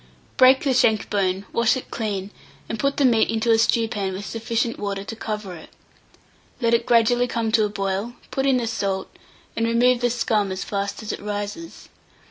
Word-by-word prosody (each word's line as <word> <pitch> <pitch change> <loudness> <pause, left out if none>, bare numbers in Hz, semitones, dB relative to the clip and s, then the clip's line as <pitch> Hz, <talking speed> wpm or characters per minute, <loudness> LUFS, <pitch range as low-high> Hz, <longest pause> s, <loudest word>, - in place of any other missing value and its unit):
Break 260 +1 +6
the 275 -3 +2
shank 220 -4 +2
bone, 195 -1 0
wash 235 +3 +3
it 260 - -9
clean, 205 -3 -3 0.4
and 225 - -4
put 275 0 0
the 280 - +3
meat 230 -3 +3
into 225 +1 +1
a 225 - +4
stewpan 220 -4 +1
with 195 +2 -6
sufficient 230 +1 -2
water 200 -1 -3
to 225 - -7
cover 210 -4 -5
it. 160 - -12 0.9
Let 235 -2 +1
it 235 0 +2
gradually 240 +1 +3
come 230 -2 -2
to 220 -2 +4
a - - -2
boil, 200 +3 -3 0.2
put 270 0 0
in 265 -2 +4
the 240 - -1
salt, 195 -4 -3 0.4
and 230 0 0
remove 240 +1 +3
the 245 - +2
scum 220 -4 0
as 190 0 -3
fast 200 +2 -3
as 215 - -4
it - - -6
rises. 205 +10 -6
225 Hz, 195 wpm, -23 LUFS, 205-240 Hz, 0.9 s, Break